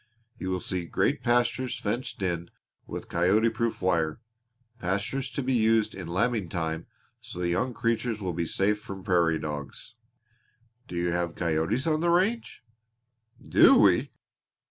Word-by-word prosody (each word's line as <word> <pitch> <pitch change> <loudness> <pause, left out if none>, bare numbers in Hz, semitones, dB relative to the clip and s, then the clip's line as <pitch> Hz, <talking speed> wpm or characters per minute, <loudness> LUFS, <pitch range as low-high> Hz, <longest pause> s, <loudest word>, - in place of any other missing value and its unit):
You 95 - -3
will 90 0 -1
see 90 -1 -3
great - - 0
pastures 120 +1 +1
fenced 110 -1 -3
in 85 -2 -2 0.4
with - - -6
coyote 95 +7 +3
proof 115 -2 -2
wire 80 -4 +1 0.6
pastures 100 +8 -2
to 140 - -3
be 130 +1 0
used 110 -2 +3
in 95 -3 -7
lambing 105 +1 0
time 80 -2 -3 0.3
so - - -10
the 90 -1 -1
young 125 +9 0
creatures 115 -1 -1
will 95 -3 -3
be 85 0 -2
safe 105 +4 +1
from 95 -2 -8
prairie 85 -4 +2
dogs." 75 - -6 0.9
"Do - - -7
you 85 0 0
have 85 -1 -1
coyotes 85 - 0
on 155 -1 +1
the 170 +1 +1
range?" 190 - +1 0.8
"Do - - +7
we? - - +4
95 Hz, 150 wpm, -27 LUFS, 85-115 Hz, 0.9 s, Do